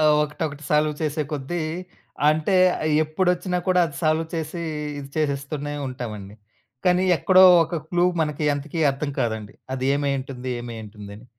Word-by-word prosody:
ఆ! - - +3 0.2
ఒకటొకటి 150 0 -4
సాల్వ్ 150 0 +3
చేసే 155 0 0
కొద్దీ 150 +4 -3 0.7
అంటే, 155 +5 +2 0.3
ఆహ్, 155 - +1
ఎప్పుడొచ్చినా 180 +3 0
కూడా 180 -1 +4
అది 145 -3 -9
సాల్వ్ 155 +1 +2
చేసీ, 165 +1 -4 0.4
ఇది 140 -1 -7
చేసేస్తూనే 145 0 -2
ఉంటావండి, 105 -6 -7 0.5
కానీ 180 0 +3
ఎక్కడో 185 +2 +6 0.2
ఒక 170 - -4
క్లూ 175 +1 +2 0.2
మనకి 150 -1 -1
అంతకీ 150 +3 -4
అర్థం 140 +2 -3
కాదండి. 110 -3 -2 0.2
అది 130 -1 -3
ఏమైయుంటుంది 135 -3 -2
ఏమైయుంటుందని. 110 -2 -9
150 Hz, 135 wpm, -23 LUFS, 130-160 Hz, 0.7 s, ఎక్కడో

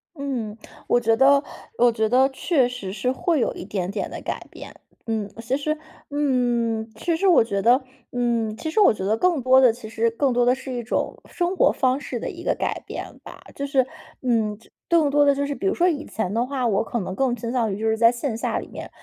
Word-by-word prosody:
嗯， 255 -7 -4 0.3
我 240 - +4
觉 225 -1 +2
得 275 +3 +5 0.3
我 245 -1 +5
觉 220 -1 0
得 260 +4 +4
确 265 -2 +1
实 200 -6 -6
是 230 +5 -1
会 320 +4 0
有 - - +1
一 - - -8
点 190 -2 -3
点 200 +1 -3
的 - - -7
改 - - -5
变。 - - -11 0.3
嗯， 215 -3 -2
其 255 +4 -1
实 305 +2 -2 0.3
嗯， 240 -6 0
其 335 -2 -1
实 395 - +1
我 345 -10 +6
觉 200 -3 -2
得 245 +5 +4 0.3
嗯， 235 -3 0
其 315 +7 -5
实 430 - +1
我 400 - +6
觉 190 - -6
得 215 +3 +1
更 345 -4 +2
多 260 +1 +6
的 250 -4 +6
其 230 -2 -10
实 230 +1 +1
更 265 +3 +1
多 245 0 +2
的 245 - +5
是 265 0 -8
一 240 -1 -3
种 220 - -2
生 355 +1 -2
活 - - +4
方 260 +1 +1
式 - - -5
的 - - -4
一 - - -9
个 - - +1
改 - - -2
变 - - -7
吧。 - - -12
就 280 0 -4
是， 265 -2 +2 0.4
嗯， 220 -5 0 0.3
更 330 -4 +4
多 290 +1 +4
的 280 - +5
就 285 0 -1
是 285 - -3
比 390 - -6
如 390 - +2
说 360 +1 +3
以 305 -3 -3
前 205 -3 -3
的 235 +2 +1
话， 265 -2 -2
我 200 -3 +2
可 235 - -2
能 185 0 -4
更 255 0 +1
倾 230 0 -5
向 230 -5 0
于 - - -4
就 225 - +1
是 220 - +1
在 230 +1 +6
线 240 -1 -3
下 - - -1
里 - - -8
面 - - -8
245 Hz, 260 characters per minute, -23 LUFS, 225-280 Hz, 0.4 s, 我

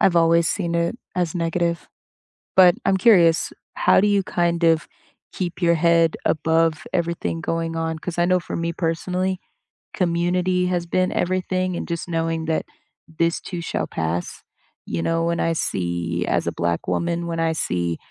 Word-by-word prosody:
I've 175 -2 +4
always 165 0 +4
seen 170 -4 -1
it 170 +7 0 0.2
as 180 -2 -1
negative, 170 -1 -1 0.7
but 180 -2 +7
I'm 190 - +3
curious, 175 -6 +4 0.2
how - - +4
do 210 - +3
you 200 -1 +2
kind 170 -1 0
of 165 -1 +3 0.5
keep 180 -1 -4
your 170 0 +4
head 165 0 +3
above 160 0 +1
everything 170 -1 -1
going 165 0 -2
on? 160 -1 -2
'Cause 175 0 -6
I 175 - +3
know 185 +1 +3
for - - -6
me 170 0 -2
personally, 180 +3 -1 0.5
community 180 +1 +1
has 175 -1 -1
been 185 +2 0
everything, 185 0 -1
and - - -4
just 170 0 -4
knowing 165 -1 -1
that 160 0 -1 0.4
this 165 +1 0
too 175 -2 -6
shall - - -2
pass. 80 +2 -3 0.4
You 85 - -3
know, 165 - 0
when 170 0 0
I 165 - +1
see 85 - -2
as - - 0
a - - +1
Black 85 0 -2
woman, 170 0 -1
when 165 -1 -3
I 165 0 +1
see 85 - -1
170 Hz, 170 wpm, -22 LUFS, 165-180 Hz, 0.7 s, but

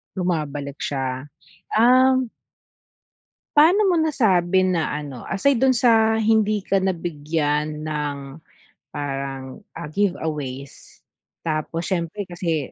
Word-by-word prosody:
Bumabalik 150 -6 -2
siya, 130 -1 -3 0.5
um 255 +2 +4 1.3
Paano 340 +8 +6
mo 345 - +2
nasabi 190 - +2
na 175 -4 +1
ano, 145 -5 -7
aside 240 +5 +2
do'n 265 -1 +4
sa 225 -2 +4
hindi 215 -2 +2
ka 195 - +1
nabigyan 155 -4 -1
ng 145 -2 -4 0.6
parang, 135 0 -5 0.2
ah, 165 -3 -7
giveaways, 150 -8 -4 0.4
tapos 160 +1 -2
siyempre 180 +3 -2
kasi 170 -5 -3
170 Hz, 100 wpm, -22 LUFS, 145-215 Hz, 1.3 s, Paano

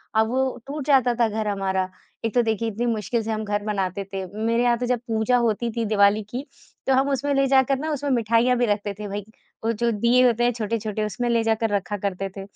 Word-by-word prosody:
अब 220 0 +4
वो 260 +1 0
टूट 285 -1 -5
जाता 255 -4 +4
था 235 - +4
घर 215 0 -2
हमारा। 190 -2 -1 0.4
एक 225 - -1
तो 245 - +5
देखिए 225 0 -1
इतनी 225 +3 -3
मुश्किल 230 0 -1
से 225 - -3
हम 220 0 -2
घर 205 0 -1
बनाते 195 -2 -2
थे, 190 -1 -3 0.2
मेरे 230 +1 +2
यहाँ 240 -1 +3
तो 245 - -2
जब 245 -1 0
पूजा 225 +2 +2
होती 235 0 0
थी 230 0 -2
दिवाली 205 0 +3
की, 255 +5 -5 0.4
तो 270 - +4
हम 270 +2 +3
उसमें 280 +1 0
ले 275 0 +3
जाकर 265 0 +3
ना 310 +2 -2
उसमें 285 -1 -2
मिठाइयाँ 235 +1 +3
भी 245 - +2
रखते 205 -1 -1
थे, 210 +1 -7
भाई, 205 0 -4 0.4
वो 225 - +2
जो 235 +1 0
दीये 235 +4 +3
होते 240 -1 +3
हैं 240 - +3
छोटे-छोटे, 215 -1 -2
उसमें 240 +3 -2
ले 230 -1 +2
जाकर 225 0 +1
रखा 200 +1 -2
करते 195 -1 -3
थे। - - -4
230 Hz, 240 wpm, -24 LUFS, 210-245 Hz, 0.4 s, तो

